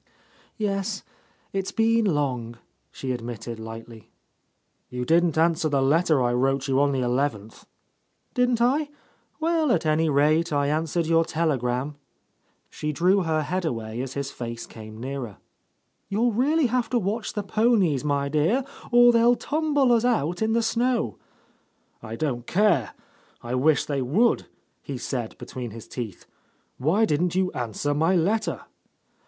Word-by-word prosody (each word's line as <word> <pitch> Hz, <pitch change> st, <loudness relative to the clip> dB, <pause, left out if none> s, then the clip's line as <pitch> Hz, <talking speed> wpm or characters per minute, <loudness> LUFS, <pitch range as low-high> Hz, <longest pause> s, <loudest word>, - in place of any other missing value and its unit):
"Yes, 200 Hz, -1 st, -2 dB, 0.5 s
it's 195 Hz, -1 st, -2 dB
been 225 Hz, 0 st, +2 dB
long," 130 Hz, -, -1 dB, 0.3 s
she 130 Hz, -, -4 dB
admitted 120 Hz, -1 st, -5 dB
lightly. 115 Hz, -1 st, -10 dB, 0.8 s
"You 125 Hz, 0 st, -4 dB
didn't 165 Hz, 0 st, +3 dB
answer 160 Hz, -1 st, +2 dB
the 140 Hz, -2 st, +1 dB
letter 155 Hz, -1 st, +3 dB
I 120 Hz, 0 st, +1 dB
wrote 135 Hz, +2 st, +1 dB
you 135 Hz, 0 st, +2 dB
on 145 Hz, 0 st, +3 dB
the 135 Hz, -2 st, 0 dB
eleventh." 120 Hz, -4 st, -2 dB, 0.7 s
"Didn't 245 Hz, -1 st, +2 dB
I? 285 Hz, +4 st, +2 dB, 0.5 s
Well, 320 Hz, -3 st, +1 dB
at 230 Hz, -, +1 dB
any 155 Hz, +1 st, +2 dB
rate 155 Hz, +4 st, +3 dB
I 145 Hz, -1 st, +1 dB
answered 160 Hz, +2 st, 0 dB
your 165 Hz, 0 st, +3 dB
telegram." 140 Hz, -4 st, -1 dB, 0.7 s
She 150 Hz, -, -3 dB
drew 180 Hz, +6 st, +3 dB
her 160 Hz, -3 st, 0 dB
head 185 Hz, +4 st, -2 dB
away 115 Hz, -6 st, -3 dB
as 130 Hz, 0 st, -6 dB
his 140 Hz, -1 st, -3 dB
face 115 Hz, -1 st, -6 dB
came 110 Hz, -1 st, -11 dB
nearer. 130 Hz, -4 st, -5 dB, 0.7 s
"You'll 230 Hz, +4 st, +1 dB
really 290 Hz, +7 st, +2 dB
have 245 Hz, 0 st, 0 dB
to 250 Hz, -, +1 dB
watch 210 Hz, +1 st, -2 dB
the 205 Hz, -, -3 dB
ponies, 200 Hz, -, +2 dB
my 140 Hz, -1 st, 0 dB
dear, 155 Hz, -, +1 dB, 0.3 s
or 240 Hz, 0 st, +7 dB
they'll 235 Hz, +1 st, +5 dB
tumble 290 Hz, -2 st, +1 dB
us 235 Hz, -1 st, +4 dB
out 180 Hz, -, 0 dB
in 220 Hz, 0 st, +1 dB
the 230 Hz, 0 st, +2 dB
snow." 235 Hz, -, 0 dB, 0.8 s
"I 110 Hz, +1 st, -6 dB
don't 120 Hz, -3 st, -3 dB
care. 180 Hz, -, +2 dB, 0.5 s
I 120 Hz, +1 st, -4 dB
wish 145 Hz, +4 st, +3 dB
they 140 Hz, -2 st, -2 dB
would 195 Hz, -, +2 dB
I" -, -, -19 dB, 0.4 s
he 140 Hz, -, -6 dB
said 120 Hz, -2 st, -4 dB
between 125 Hz, -2 st, -6 dB
his 110 Hz, +1 st, -10 dB
teeth. 110 Hz, -7 st, -7 dB, 0.5 s
"Why 170 Hz, -, +3 dB
didn't 175 Hz, +1 st, 0 dB
you 185 Hz, -1 st, +1 dB
answer 120 Hz, +4 st, -2 dB
my 160 Hz, +5 st, +2 dB
letter?" 205 Hz, +6 st, 0 dB
155 Hz, 150 wpm, -25 LUFS, 130-215 Hz, 0.8 s, or